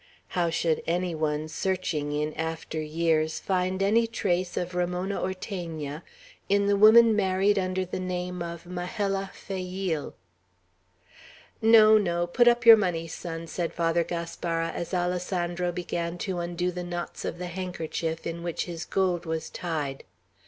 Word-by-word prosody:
How 175 -2 +1
should 165 -1 0
any 175 +1 0
one, 155 -1 -1
searching 165 -4 -2
in 150 +1 -1
after 160 -1 -4
years, 155 0 0
find 185 0 0
any 225 +4 +3
trace 185 -5 -1
of 180 +1 -2
Ramona 180 +2 -1
Ortegna, 170 -6 -4 0.5
in 200 0 +3
the 200 0 +3
woman 220 +2 +7
married 195 0 +2
under 185 0 -1
the 185 - -4
name 180 -1 -3
of 170 0 -6
"Majella 195 +2 -2
Fayeel"? 185 -4 -4 1.5
"No, 220 -1 +7
no! 175 -3 0
Put 240 +8 +3
up 240 0 +4
your 230 -1 +11
money, 175 -5 -1
son," 165 0 -6
said 170 0 -3
Father 170 0 +2
Gaspara, 165 -1 -3
as 170 - -5
Alessandro 180 -1 -1
began 175 -1 -3
to 185 0 -3
undo 175 +1 -1
the 180 0 -5
knots 175 0 -5
of - - -3
the 180 - -5
handkerchief 170 -2 -4
in 170 0 -4
which 170 -1 -2
his 170 -1 -6
gold 180 -3 0
was 160 0 -3
tied. 150 -6 -3
175 Hz, 145 wpm, -27 LUFS, 165-190 Hz, 1.5 s, your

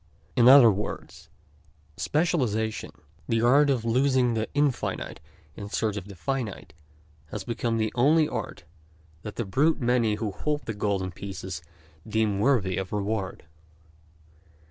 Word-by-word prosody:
In 120 -1 +5
other 130 -4 +9
words, 100 +2 -6 0.7
specialization, 125 -10 0 0.4
the 115 0 +1
art 140 +4 +5
of 125 -5 0
losing 130 0 +2
the 110 -1 -1
infinite 145 -3 -1 0.4
in 100 +3 -7
search 110 -1 -1
of 100 -2 -6
the 100 - -10
finite, 120 +3 -4 0.5
has - - -6
become 115 -1 -2
the 110 -1 0
only, 150 +6 +4
art - - -5 0.6
that 105 - -7
the 120 - -3
brute 145 +12 +2
many 120 -4 +2
who 105 -1 -3
hold 150 +8 -3
the 110 - -3
golden 100 -3 -1
pieces 95 -2 -7 0.5
deem 110 -2 +1
worthy 105 -7 +2
of 95 -1 -4
reward. 105 -1 -3
115 Hz, 135 wpm, -26 LUFS, 105-130 Hz, 0.7 s, other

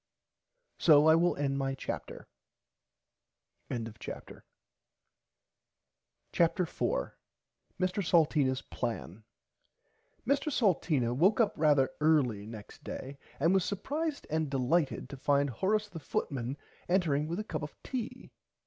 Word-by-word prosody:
So 150 -2 +6
I 160 - +8
will 170 +2 +3
end 140 -1 -1
my 135 0 -1
chapter. - - -6 1.4
[Pg 115 -2 -3
41] - - -8 1.9
CHAPTER 170 +1 +2
4 60 - -2 0.6
MR 185 +2 0
SALTEENAS 150 -6 +3
PLAN 110 -3 -5 1.0
Mr 280 +4 +1
Salteena 160 - +2
woke 190 - +4
up 225 - +3
rarther 145 -4 +4
early 135 -10 +2
next 110 -2 -10
day 140 +1 -7 0.2
and 165 +6 +3
was 190 -2 +3
supprised 285 - -3
and 155 -1 0
delighted 140 +3 0
to 140 - -8
find 140 0 +2
Horace 210 - 0
the 175 -5 -8
footman 135 -3 -3 0.3
entering 155 -5 +2
with 170 +4 -3
a - - -2
cup 160 -8 -4
of 150 - -7
tea. 250 0 -5
155 Hz, 120 wpm, -31 LUFS, 135-185 Hz, 1.9 s, I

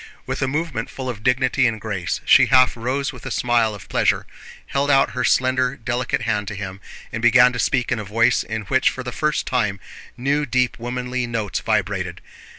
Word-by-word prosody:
With - - -4
a 135 - +1
movement 145 -4 -3
full 130 -1 -7
of 110 -4 -6
dignity 125 +2 +2
and 110 -2 -2
grace 100 -5 -3
she - - +6
half 130 0 +5
rose 130 +4 -2
with 125 - -12
a - - -3
smile 115 -3 +1
of 100 - -12
pleasure, - - +1 0.4
held 140 +1 -1
out 135 -1 +4
her - - -2
slender, 130 +1 +2
delicate 120 0 -2
hand 105 -2 -1
to 105 - -5
him, 95 -1 -7 0.3
and 110 - -3
began 125 +1 +6
to 125 - -4
speak 125 -2 0
in 120 - 0
a - - -4
voice 115 +4 +2
in 110 -1 -5
which 130 +5 +2
for 130 - -6
the 125 - -5
first 150 +4 -1
time 105 -6 -1 0.4
new 145 +3 0
deep 125 0 0
womanly 125 +1 -3
notes 110 -4 -2
vibrated. 100 -4 -1
120 Hz, 200 wpm, -21 LUFS, 110-130 Hz, 0.4 s, she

